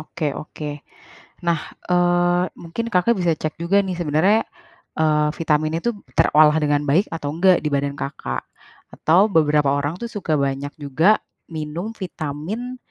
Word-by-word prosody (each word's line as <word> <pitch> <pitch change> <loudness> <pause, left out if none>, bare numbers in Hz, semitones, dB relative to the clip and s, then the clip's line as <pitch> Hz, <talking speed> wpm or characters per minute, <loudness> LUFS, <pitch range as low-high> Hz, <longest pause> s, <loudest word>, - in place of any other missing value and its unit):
oke 160 -1 -4
oke. 150 -1 -6 0.8
Nah, 165 -2 +2 0.3
eee, 175 0 +3
mungkin 175 +8 -5
Kakak 190 +5 +3
bisa 175 -2 +2
cek 155 0 -4
juga 195 +4 +3
nih, 185 -2 -3
sebenarnya, 175 +7 +3 0.6
eee, 150 -1 +3
vitaminnya 155 0 0
tuh, 240 -2 0 0.2
terolah 150 0 +6
dengan 145 -1 +1
baik, 160 +8 +2
atau 145 -3 -3
enggak, 180 +1 +4
di - - +1
badan 140 0 0
Kakak? 140 0 -4 0.5
Atau, 185 +7 +4
beberapa 150 -2 +3
orang 145 +4 -1
tuh, 235 - -4
suka 170 -7 -1
banyak 140 +1 -2
juga 160 +9 +3 0.3
minum 160 +5 -5
Vitamin 185 - -5
160 Hz, 145 wpm, -21 LUFS, 150-180 Hz, 0.8 s, terolah